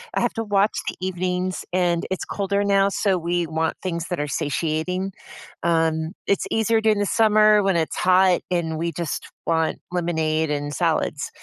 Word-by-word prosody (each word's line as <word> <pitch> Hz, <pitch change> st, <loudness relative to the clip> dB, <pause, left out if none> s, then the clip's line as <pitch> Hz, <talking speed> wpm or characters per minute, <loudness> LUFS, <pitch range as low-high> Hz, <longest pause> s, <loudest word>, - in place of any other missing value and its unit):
I -, -, +1 dB
have -, -, +1 dB
to 225 Hz, -, -1 dB
watch 205 Hz, 0 st, +2 dB
the -, -, -2 dB
evenings, 185 Hz, 0 st, -2 dB
and 175 Hz, -2 st, +1 dB
it's 190 Hz, -, -2 dB
colder 200 Hz, 0 st, -1 dB
now, 200 Hz, -1 st, +3 dB
so 195 Hz, -1 st, +1 dB
we 175 Hz, +1 st, -1 dB
want 160 Hz, +1 st, -1 dB
things 170 Hz, -2 st, -3 dB
that 180 Hz, -, -2 dB
are 150 Hz, -, -2 dB
satiating, 160 Hz, +6 st, -2 dB, 0.5 s
um, 160 Hz, -1 st, +1 dB
it's 200 Hz, -, +1 dB
easier 225 Hz, 0 st, +2 dB
during 215 Hz, -2 st, +2 dB
the 205 Hz, -, +1 dB
summer 215 Hz, -1 st, +4 dB
when 195 Hz, -2 st, +2 dB
it's 160 Hz, -1 st, -1 dB
hot, 185 Hz, 0 st, +4 dB
and 165 Hz, -3 st, -1 dB
we 170 Hz, +1 st, -1 dB
just 170 Hz, -1 st, -4 dB, 0.2 s
want 160 Hz, -1 st, 0 dB
lemonade 160 Hz, -3 st, 0 dB
and 145 Hz, 0 st, -2 dB
salads. 160 Hz, -4 st, 0 dB
175 Hz, 175 wpm, -23 LUFS, 160-195 Hz, 0.5 s, summer